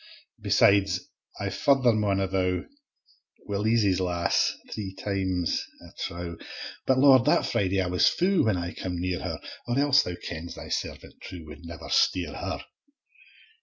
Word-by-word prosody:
Besides, 100 -2 +4 0.4
I - - -2
farther 135 -4 +3
maun 105 -3 +1
allow, 95 -1 0 0.8
Wi' 100 - -2
Leezie's 105 -3 +2
lass, 90 -2 +1 0.2
three 95 -3 -5
times 95 -3 -1 0.2
I - - -14 0.2
trow 85 -1 -6 0.5
But 130 - +4
Lord, 130 -2 +6
that - - +3
Friday 95 0 0
I 95 - +1
was 90 0 +3
fou, 185 -2 +2
When 105 -4 +2
I 85 +1 -4
cam 90 -2 -4
near 90 0 -1
her; - - -4 0.3
Or 120 +1 0
else, 145 +1 +5
Thou 90 - -4
kens, 85 -1 -7
Thy - - -9
servant - - -5
true 85 -3 -9
Wad 75 0 -10
never 85 -1 -8
steer 85 -5 +2
her. - - -5
95 Hz, 155 wpm, -27 LUFS, 90-110 Hz, 0.8 s, Lord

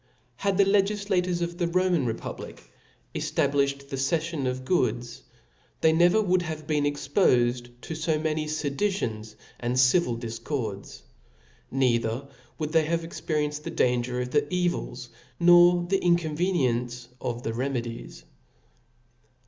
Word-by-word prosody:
Had 200 -1 0
the 200 - +6
legifiators 195 -3 +1
of 170 +1 -5
the 175 - +1
Roman 175 -5 +1
republic 115 0 -7 0.4
efta* - - 0
blifhed 140 0 -1
the 135 - -4
cefiion 155 0 -1
of 130 0 -3
goods 120 -7 0
f, - - -31 0.4
they 160 - +5
never 175 +6 +4
would 185 -3 +2
have 155 -2 -5
been 150 -2 +1
expofed 125 -5 +1
to 160 - -6
fd 160 -1 -1
many 155 -1 -1
fedicions 140 - -2 0.2
and 125 +1 -1
civil 125 -1 +3
diicords 115 - -5 0.7
1 135 - -4
neither 120 +1 +1 0.3
would 155 -1 -3
they 160 -1 +3
have 165 +1 -1
experienced 150 -2 -3
the - - -5
danger 125 0 0
of 125 0 -3
the 145 0 +1
evils, 175 -9 -2 0.3
nor 175 0 +6
the 195 +1 0
inconveniency 150 -8 0
of 120 -1 -3
the 115 - -2
remedies. 120 - -4
150 Hz, 135 wpm, -26 LUFS, 125-175 Hz, 0.7 s, the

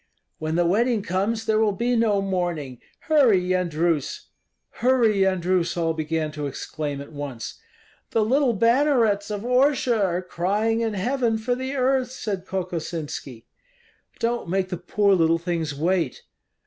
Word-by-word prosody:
"When 155 0 -2
the 175 0 +2
wedding 220 +4 +2
comes, 210 +4 -1
there 220 -1 +2
will 215 -2 +2
be 240 +4 0
no 215 -4 +2
mourning. 175 -9 -2 0.2
Hurry, 270 -11 +4
Yendrus!" 175 -4 -1 0.5
"Hurry, 240 -3 +3
Yendrus!" 185 -2 +1
all 165 -1 +1
began 155 0 -2
to 150 -1 -4
exclaim 145 +1 -5
at 140 - -10
once. 140 -6 -6 0.5
"The 220 -2 +1
little 260 +1 +2
bannerets 230 -3 +2
of 205 -1 -3
Orsha 250 -3 +2
are 180 -1 0
crying 205 +6 0
in 225 -2 -1
heaven 235 +2 0
for 230 +3 -1
the 260 +2 -3
earth," 260 -1 +1
said 205 -7 -5
Kokosinski. 165 -9 -5 0.7
"Don't 235 -5 -2
make 185 +1 0
the 180 - -3
poor 200 +3 +2
little 165 -2 +3
things 165 -3 -3
wait!" 165 -1 -1
190 Hz, 145 wpm, -24 LUFS, 165-230 Hz, 0.7 s, Hurry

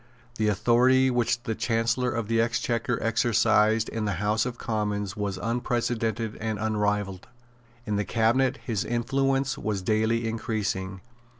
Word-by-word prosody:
The 110 - +2
authority 125 +5 +4
which 120 -1 0
the 115 -4 -2
Chancellor 115 +2 0
of 115 -3 -2
the 115 0 +2
Exchequer 120 0 0
exercised 110 -1 +3
in 110 -1 -3
the 100 - 0
House 105 +6 0
of 120 -1 -6
Commons 105 -3 -2
was 100 -2 -3
unprecedented 115 0 -1
and 110 -1 -3
unrivalled. 105 -3 -1 0.6
In 105 -2 -1
the 105 - +1
Cabinet 125 +6 +2
his 110 -6 -1
influence 135 +3 0
was 100 -3 -2
daily 110 +3 +1
increasing. 100 -4 -3
115 Hz, 135 wpm, -26 LUFS, 105-120 Hz, 0.6 s, authority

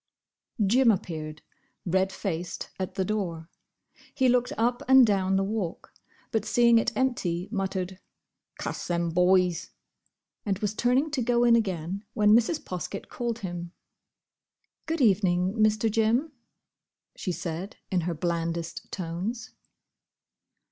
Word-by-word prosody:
Jim 245 +5 +4
appeared, 155 -6 -2 0.4
red 190 +2 +1
faced, 180 -3 -4
at 185 - -4
the 190 - 0
door. 180 -6 -3 0.7
He 260 -2 +3
looked 250 0 +2
up 240 +2 +1
and 265 -1 +8
down 195 -3 +1
the 195 - +2
Walk, 195 -4 -4 0.4
but 220 -3 0
seeing 235 -1 +4
it - - 0
empty, 190 -9 0
muttered, 190 -3 -3 0.6
"Cuss - - -4
them 170 -1 0
boys!" 180 0 +3 0.7
and 195 -3 -1
was 210 0 -2
turning 250 +7 +1
to 275 -4 -1
go 240 0 +2
in 235 -1 +6
again, 190 -3 -1
when 210 -1 +4
Mrs. 240 +7 +2
Poskett 185 +2 -5
called 235 -1 -3
him. 175 -1 -6 1.1
"Good 325 -1 -1
evening, 190 -4 +3
Mr. 215 0 +2
Jim," 225 +8 +1 0.8
she 185 - -3
said, 175 +3 -5 0.2
in 185 -2 +2
her 170 0 -2
blandest 170 0 -3
tones. 185 +6 -4
195 Hz, 125 wpm, -27 LUFS, 175-230 Hz, 1.1 s, and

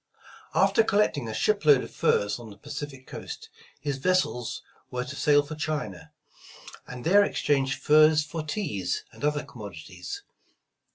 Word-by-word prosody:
After 225 - +5
collecting 200 - +1
a 110 - -4
ship 200 - +1
load 145 -4 +6
of - - -10
furs 105 +3 +1
on 115 -2 -10
the 100 - -12
Pacific 135 +4 -7
coast, - - -8 0.3
his 140 -1 -3
vessels 185 -8 0 0.3
were 125 0 -2
to 140 +2 -7
sail 145 -1 +4
for 145 +2 -7
China, 150 - -4 0.8
and 125 -1 -8
there 200 +5 +6
ex - - -2
change 135 -2 +2
furs 155 0 +5
for 160 +2 -4
teas 150 - -2
and - - -14
other 150 0 +1
commodities. 90 - -8
145 Hz, 155 wpm, -27 LUFS, 120-155 Hz, 0.8 s, load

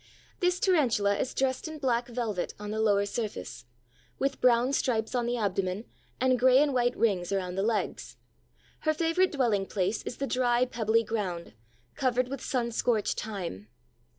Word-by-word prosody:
This 360 -1 +1
Tarantula 235 - +3
is 260 - -2
dressed 265 +2 0
in 315 0 -7
black 245 -4 0
velvet 230 -6 -3
on 210 0 -5
the 220 +1 -1
lower 200 -2 +3
surface, 205 - -5 0.5
with 275 - -1
brown 250 +2 +4
stripes 225 -5 0
on 240 -2 0
the 245 0 0
abdomen 195 -1 -1 0.3
and 255 -1 +3
gray 255 +1 +6
and 285 0 +3
white 245 -1 +1
rings 195 -6 +1
around 185 -2 -1
the 190 - -1
legs. 215 +1 -2 0.6
Her 310 -1 0
favorite 335 +3 +2
dwelling 225 -8 +1
place 195 +2 -1
is - - -6
the 275 - -1
dry, 250 -2 +2
pebbly 230 -2 +1
ground, 200 -6 -3 0.4
covered 255 -1 0
with 275 -1 -5
sun 240 -3 -1
scorched 225 -2 0
thyme. 180 - -6
235 Hz, 165 wpm, -29 LUFS, 205-255 Hz, 0.6 s, gray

